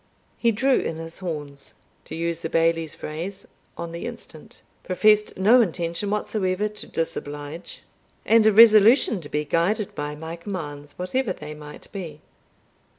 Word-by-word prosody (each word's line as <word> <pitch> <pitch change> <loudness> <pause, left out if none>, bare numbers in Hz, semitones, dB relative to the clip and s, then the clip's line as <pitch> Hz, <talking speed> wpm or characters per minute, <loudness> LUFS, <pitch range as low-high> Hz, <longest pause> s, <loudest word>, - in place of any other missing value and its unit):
He 235 - +2
"drew 260 +5 +2
in 165 - -3
his 165 0 -7
horns," 150 -6 -6 0.3
to - - -7
use 170 0 -2
the 160 - -3
Bailie's 165 -1 +1
phrase, 175 +6 -6 0.3
on 170 0 -5
the 170 - -5
instant, - - -10 0.2
professed 210 +3 +3
no 220 +7 +6
intention 175 0 -1
whatever 210 -1 -1
to 210 0 -9
disoblige, 150 0 -5 0.4
and 225 -1 +5
a - - +6
resolution 220 0 +6
to 145 - -10
be 150 0 -1
guided 190 +7 0
by 145 0 -4
my 160 +2 -7
commands, 150 -6 -7
whatever 190 +4 -1
they 150 -2 -8
might 150 -1 -11
be. 165 -7 -7
170 Hz, 150 wpm, -24 LUFS, 160-210 Hz, 0.4 s, no